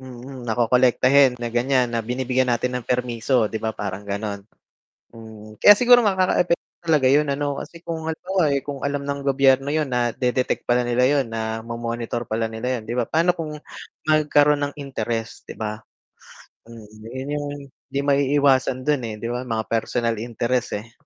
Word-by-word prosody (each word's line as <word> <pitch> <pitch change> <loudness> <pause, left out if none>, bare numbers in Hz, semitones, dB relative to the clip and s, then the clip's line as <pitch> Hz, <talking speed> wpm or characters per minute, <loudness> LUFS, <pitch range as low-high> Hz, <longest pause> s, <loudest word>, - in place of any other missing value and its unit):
Mm. 130 0 -10
Nakokolektahin 125 +3 +3
na 120 - -2
ganyan, 125 +1 +1
na 115 -2 -2
binibigyan 125 +1 0
natin 125 +2 -1
ng 125 - -5
permiso, 125 -2 0
'di 110 - -4
ba, 110 0 -2
parang 100 -1 -5
gano'n, 100 0 -4 0.7
mm. 110 -2 -12
Kaya 205 - +9
siguro 245 +2 +6
nga 205 -5 +2
kakaepek 185 -2 +2 0.2
talaga 155 -6 +2
'yun 150 +1 +3
ano, 140 0 -2
kasi 170 0 -10
kung 160 -1 -5
halimbawa, 180 +3 -1 0.2
kung 140 -2 -6
alam 140 0 -3
ng 140 0 -3
gobyerno 135 0 +3
'yon, 150 -2 -1
nade-detect 125 +1 0
pala 120 0 +1
nila 120 +1 +2
'yon, 140 -4 +1
na 110 0 -3
mo-monitor 115 +1 -4
pala 110 0 -2
nila 115 +3 -3
'yon, - - -12
'di 120 - -3
ba, 125 - +1
paano 165 +8 +1
kung 150 -2 -6 0.5
magkaroon 150 -1 +3
ng 145 - -3
interes, 115 -5 -4
'di - - -11
ba? 110 0 -4 0.8
Mm, 115 -2 -13 0.2
'yun 130 +4 -7
'yung 145 0 -3 0.4
'di 140 - -1
maiiwasan 140 -2 +2
do'n, 145 -4 +2
eh, 105 - -6
di 115 - -4
ba, 120 +1 -3
mga 115 -3 -3
personal 115 0 -1
interest, 120 -2 -2
eh. 115 +2 -14
125 Hz, 170 wpm, -22 LUFS, 115-140 Hz, 0.8 s, Kaya